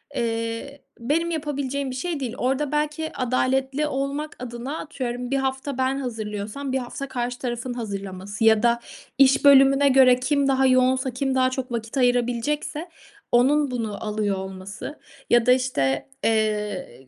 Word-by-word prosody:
eee, 230 Hz, +4 st, -3 dB, 0.2 s
benim 315 Hz, +8 st, 0 dB
yapabileceğim 280 Hz, -3 st, -2 dB
bir -, -, -6 dB
şey 325 Hz, +3 st, -3 dB
değil. 250 Hz, -3 st, -4 dB
Orada, 270 Hz, +3 st, 0 dB
belki, 300 Hz, +1 st, -1 dB
adaletli 265 Hz, +3 st, 0 dB
olmak 280 Hz, +2 st, -3 dB
adına, 245 Hz, +5 st, -5 dB
atıyorum, 250 Hz, -4 st, -5 dB
bir 275 Hz, -, +2 dB
hafta 265 Hz, 0 st, -2 dB
ben 260 Hz, +1 st, +1 dB
hazırlıyorsam 220 Hz, +1 st, -4 dB
bir -, -, +2 dB
hafta 260 Hz, +2 st, -6 dB
karşı 245 Hz, -1 st, -3 dB
tarafın 245 Hz, 0 st, -3 dB
hazırlaması 200 Hz, -2 st, -5 dB
ya 220 Hz, -1 st, +5 dB
da 235 Hz, 0 st, +3 dB, 0.4 s
iş 275 Hz, +1 st, +5 dB
bölümüne 275 Hz, 0 st, +7 dB
göre 255 Hz, -2 st, +6 dB
kim 280 Hz, +2 st, +1 dB
daha 265 Hz, -1 st, +3 dB
yoğunsa, 255 Hz, 0 st, +3 dB
kim 265 Hz, +2 st, -1 dB
daha 255 Hz, 0 st, +3 dB
çok 255 Hz, -1 st, -4 dB
vakit 230 Hz, +2 st, -4 dB
ayırabilecekse 245 Hz, +6 st, 0 dB, 0.4 s
onun 275 Hz, +3 st, +3 dB
bunu 225 Hz, -4 st, -4 dB
alıyor 210 Hz, -2 st, -1 dB
olması 190 Hz, +8 st, -7 dB, 0.3 s
ya 240 Hz, -1 st, +4 dB
da, 250 Hz, -, +5 dB
işte, 140 Hz, -, 0 dB
eee, 210 Hz, -, -1 dB
255 Hz, 150 wpm, -24 LUFS, 230-275 Hz, 0.4 s, bölümüne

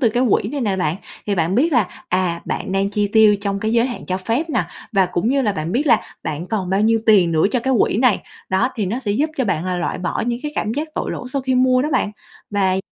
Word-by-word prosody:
từ 235 Hz, -, +4 dB
cái 245 Hz, +3 st, +1 dB
quỹ 205 Hz, -, +2 dB
này 285 Hz, +1 st, -3 dB
nè 205 Hz, -5 st, 0 dB
bạn, 165 Hz, -2 st, 0 dB, 0.3 s
thì 205 Hz, -, +1 dB
bạn 170 Hz, +1 st, 0 dB
biết 305 Hz, +7 st, +2 dB
là, 225 Hz, -8 st, 0 dB
à, 180 Hz, -2 st, 0 dB
bạn 190 Hz, 0 st, -3 dB
đang 195 Hz, +1 st, +1 dB
chi 205 Hz, 0 st, 0 dB
tiêu 215 Hz, -2 st, +6 dB
trong 200 Hz, -1 st, -2 dB
cái 220 Hz, +1 st, -1 dB
giới 235 Hz, +1 st, +3 dB
hạn 245 Hz, -, -6 dB
cho 185 Hz, -, -1 dB
phép 235 Hz, -, -2 dB
nè, -, -, +2 dB, 0.3 s
và 190 Hz, -2 st, +3 dB
cũng 180 Hz, +5 st, -1 dB
như 275 Hz, +1 st, +2 dB
là 210 Hz, -, +1 dB
bạn 165 Hz, -1 st, -4 dB
biết 290 Hz, +5 st, 0 dB
là 230 Hz, -4 st, +5 dB, 0.2 s
bạn 160 Hz, +3 st, -4 dB
còn 190 Hz, -4 st, -2 dB
bao 195 Hz, +1 st, +2 dB
nhiêu 225 Hz, +1 st, +3 dB
tiền 185 Hz, -6 st, +5 dB
nữa 155 Hz, -, +2 dB
cho 250 Hz, -, +1 dB
cái 265 Hz, +1 st, +1 dB
quỹ -, -, +2 dB
này, 245 Hz, -2 st, +3 dB, 0.3 s
đó. 190 Hz, +7 st, +1 dB
Thì 210 Hz, -5 st, -1 dB
nó 230 Hz, +7 st, -2 dB
sẽ 205 Hz, -, 0 dB
giúp 295 Hz, +9 st, +1 dB
cho 260 Hz, -, +1 dB
bạn 175 Hz, -5 st, -1 dB
là 185 Hz, -1 st, -1 dB
loại 175 Hz, -, -2 dB
bỏ 180 Hz, 0 st, -2 dB
những 240 Hz, -1 st, -1 dB
cái 300 Hz, -, -4 dB
cảm 215 Hz, -, -1 dB
giác 300 Hz, +4 st, -3 dB
tội -, -, -2 dB
lỗi 250 Hz, -, -5 dB
sau 275 Hz, -2 st, -1 dB
khi 260 Hz, -1 st, 0 dB
mua 255 Hz, 0 st, +3 dB
đó 300 Hz, -, -1 dB
bạn. 205 Hz, -, +1 dB, 0.4 s
Và 195 Hz, -2 st, +2 dB
săn 190 Hz, -, 0 dB
210 Hz, 290 wpm, -20 LUFS, 185-250 Hz, 0.4 s, tiêu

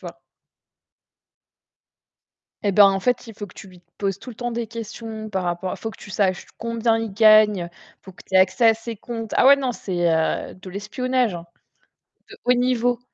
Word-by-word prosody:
vois? -, -, -10 dB, 2.4 s
Eh 205 Hz, -, +1 dB
ben, 205 Hz, +2 st, +7 dB
en 195 Hz, 0 st, -1 dB
fait, 245 Hz, +3 st, 0 dB
il 225 Hz, -, -9 dB
faut 205 Hz, 0 st, -7 dB
que 185 Hz, -, -18 dB
tu 195 Hz, -, -11 dB
lui 180 Hz, -1 st, -17 dB, 0.2 s
poses 195 Hz, -1 st, -2 dB
tout 225 Hz, -, -13 dB
le 230 Hz, -, -9 dB
temps 240 Hz, 0 st, -3 dB
des 235 Hz, 0 st, -3 dB
questions 220 Hz, -1 st, -7 dB
par 190 Hz, -2 st, -2 dB
rapport 175 Hz, +1 st, -3 dB
faut 225 Hz, -, -5 dB
que -, -, -14 dB
tu 210 Hz, -, -12 dB
saches 190 Hz, -2 st, 0 dB
combien 230 Hz, 0 st, 0 dB
il 225 Hz, -2 st, -3 dB
gagne, 210 Hz, -4 st, +5 dB, 0.3 s
faut 190 Hz, -, -12 dB
que 180 Hz, -, -16 dB
tu -, -, -9 dB
aies 190 Hz, -, +7 dB
accès 210 Hz, +5 st, +4 dB
à 225 Hz, -, +5 dB
ses 225 Hz, 0 st, -7 dB
comptes. 225 Hz, 0 st, -7 dB
Ah -, -, +5 dB
ouais 280 Hz, +1 st, +8 dB
non 265 Hz, -3 st, -2 dB
c'est, 175 Hz, -6 st, -2 dB
heu, 160 Hz, 0 st, 0 dB
de 185 Hz, 0 st, -12 dB
l'espionnage, 230 Hz, +4 st, -1 dB
hein, 170 Hz, 0 st, -8 dB, 0.8 s
de -, -, -11 dB
haut 250 Hz, -, +5 dB
niveau, 245 Hz, -1 st, +1 dB
220 Hz, 200 wpm, -22 LUFS, 190-235 Hz, 2.4 s, ouais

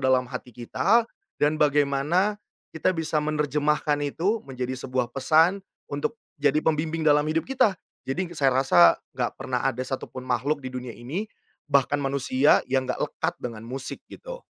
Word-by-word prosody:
dalam 130 Hz, -1 st, +3 dB
hati 125 Hz, -1 st, -7 dB
kita, 195 Hz, -, +2 dB, 0.4 s
dan 150 Hz, +1 st, +3 dB
bagaimana 150 Hz, +7 st, +2 dB, 0.4 s
kita 160 Hz, +3 st, +1 dB
bisa 160 Hz, -1 st, 0 dB
menerjemahkan 150 Hz, 0 st, +1 dB
itu, 190 Hz, +10 st, 0 dB
menjadi 130 Hz, -1 st, -4 dB
sebuah 125 Hz, -1 st, -2 dB
pesan, 160 Hz, +8 st, +3 dB, 0.3 s
untuk 145 Hz, +11 st, -2 dB, 0.2 s
jadi 145 Hz, +1 st, +3 dB
pembimbing 160 Hz, +1 st, 0 dB
dalam 150 Hz, -1 st, +4 dB
hidup 160 Hz, +1 st, 0 dB
kita. 230 Hz, -7 st, +3 dB, 0.3 s
Jadi 175 Hz, +6 st, -2 dB
saya 135 Hz, -2 st, +4 dB
rasa, 85 Hz, -9 st, +6 dB, 0.2 s
nggak -, -, -1 dB
pernah -, -, -2 dB
ada 125 Hz, -, -1 dB
satu 130 Hz, +1 st, -4 dB
pun 130 Hz, -, -8 dB
makhluk 140 Hz, +4 st, 0 dB
di 130 Hz, -, -4 dB
dunia 125 Hz, -2 st, -6 dB
ini, 150 Hz, -, -4 dB, 0.4 s
bahkan 140 Hz, 0 st, +2 dB
manusia, 135 Hz, 0 st, +3 dB
yang 130 Hz, -1 st, +1 dB
nggak -, -, -3 dB
lekat -, -, -2 dB
dengan 115 Hz, -2 st, -6 dB
musik, 130 Hz, +1 st, -6 dB
gitu. -, -, -9 dB
145 Hz, 155 wpm, -25 LUFS, 130-160 Hz, 0.4 s, rasa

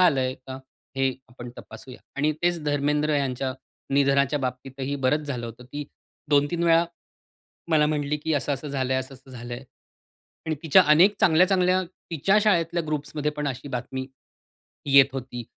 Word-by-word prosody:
आलंय 135 Hz, -8 st, +3 dB
का? 130 Hz, 0 st, -10 dB, 0.4 s
हे 135 Hz, 0 st, +2 dB, 0.2 s
आपण 120 Hz, 0 st, -10 dB
तपासूया 120 Hz, +3 st, -11 dB, 0.2 s
आणि 150 Hz, +2 st, +2 dB
तेच 175 Hz, -2 st, +1 dB
धर्मेंद्र 150 Hz, +1 st, +1 dB
यांच्या 130 Hz, -1 st, -1 dB, 0.4 s
निधनाच्या 140 Hz, +1 st, +3 dB
बाबतीतही 130 Hz, +1 st, -4 dB
बरंच 150 Hz, +4 st, +1 dB
झालं 125 Hz, -4 st, -4 dB
होतं, 115 Hz, +2 st, -10 dB
की 145 Hz, +3 st, -6 dB, 0.5 s
2-3 145 Hz, +4 st, +2 dB
वेळा 165 Hz, 0 st, +5 dB, 0.9 s
मला 150 Hz, -1 st, +4 dB
म्हटली 150 Hz, -1 st, -1 dB
की 160 Hz, +1 st, -2 dB
असं-असं 145 Hz, 0 st, -2 dB
झालंय, 130 Hz, -2 st, -1 dB
असं-असं 130 Hz, 0 st, -8 dB
झालंय. 120 Hz, +1 st, -7 dB, 0.8 s
आणि 160 Hz, -1 st, -1 dB
तिच्या 170 Hz, +4 st, +6 dB
अनेक 195 Hz, +6 st, +5 dB
चांगल्या-चांगल्या 185 Hz, +2 st, +4 dB
तिच्या 180 Hz, +2 st, -1 dB
शाळेतल्या 170 Hz, -4 st, +2 dB
ग्रुप्समध्ये 150 Hz, 0 st, -2 dB
पण 150 Hz, -1 st, -3 dB
अशी 130 Hz, +2 st, -5 dB
बातमी 130 Hz, +1 st, -4 dB, 0.9 s
येत 135 Hz, -1 st, +9 dB
होती. 125 Hz, -2 st, -6 dB
145 Hz, 140 wpm, -25 LUFS, 130-155 Hz, 0.9 s, येत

